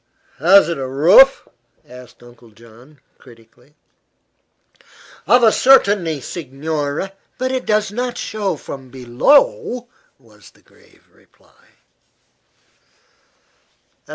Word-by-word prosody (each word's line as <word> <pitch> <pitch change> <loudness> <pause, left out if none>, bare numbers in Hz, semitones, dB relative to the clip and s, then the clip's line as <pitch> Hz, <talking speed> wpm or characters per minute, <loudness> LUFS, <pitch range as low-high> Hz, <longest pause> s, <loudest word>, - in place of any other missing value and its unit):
"Has 180 +3 +4
it 170 -4 -4
a 130 - -5
roof?" 175 - +4 0.4
asked 125 -1 -16
Uncle 120 -1 -19
John, 115 +6 -20 0.2
critically. 120 +3 -22 1.5
"Of 245 0 +3
a 225 - +5
certainty, 200 - +2
signore! 150 +3 -5 0.3
But 255 0 -3
it 260 -1 -4
does 210 -2 0
not 245 +2 -5
show 205 -5 -4
from 135 -2 -11
below," 245 - 0 0.3
was 110 -5 -21
the - - -29
grave - - -27
reply. - - -30
155 Hz, 100 wpm, -17 LUFS, -, 1.5 s, a